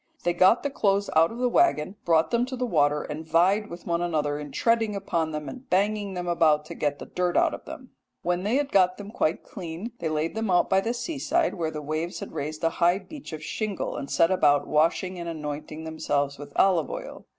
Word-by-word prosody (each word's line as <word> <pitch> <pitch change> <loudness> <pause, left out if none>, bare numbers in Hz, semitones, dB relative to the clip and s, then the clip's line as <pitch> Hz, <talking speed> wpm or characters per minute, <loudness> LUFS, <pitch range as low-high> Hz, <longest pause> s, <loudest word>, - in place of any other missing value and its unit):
They 175 - +1
got 185 +6 +4
the 285 - -1
clothes 200 -5 +1
out 165 +1 +5
of 230 - -7
the 250 0 +1
waggon, 210 - +2
brought 165 -1 +3
them 235 0 +2
to 260 - -4
the 250 0 -1
water, 150 -7 +2
and 150 +1 -6
vied 180 +6 +2
with 170 +1 -9
one 170 0 0
another 150 -4 -1
in 150 -1 -7
treading 225 -3 +1
upon 170 -5 -1
them 150 -1 -5
and 260 0 -9
banging 200 +1 +1
them 180 0 -4
about 155 -3 +3
to - - -8
get 145 -1 -1
the - - -8
dirt 180 -1 -1
out - - +3
of - - -8
them. - - -10 0.3
When 175 +1 0
they 210 +6 0
had 280 0 0
got 185 -1 +4
them 205 0 -8
quite 155 - 0
clean, 180 +5 -7
they - - -2
laid 155 +1 -1
them 220 -1 -2
out 180 -1 +3
by 190 0 +4
the 230 +4 -2
seaside 305 +6 0
where 165 -3 -2
the 150 -1 -6
waves 155 +4 -3
had - - -7
raised 155 +2 -5
a 165 - +4
high 175 +2 +5
beach 270 +7 -10
of 155 -1 -7
shingle, 215 +3 -3
and 140 - -5
set 165 +2 +3
about 145 -6 +3
washing 170 +4 +1
and 170 0 -4
anointing 155 0 -6
themselves 145 -3 -1
with 145 - -9
olive 190 -2 +3
oil. - - -7
175 Hz, 230 wpm, -26 LUFS, 155-210 Hz, 0.3 s, out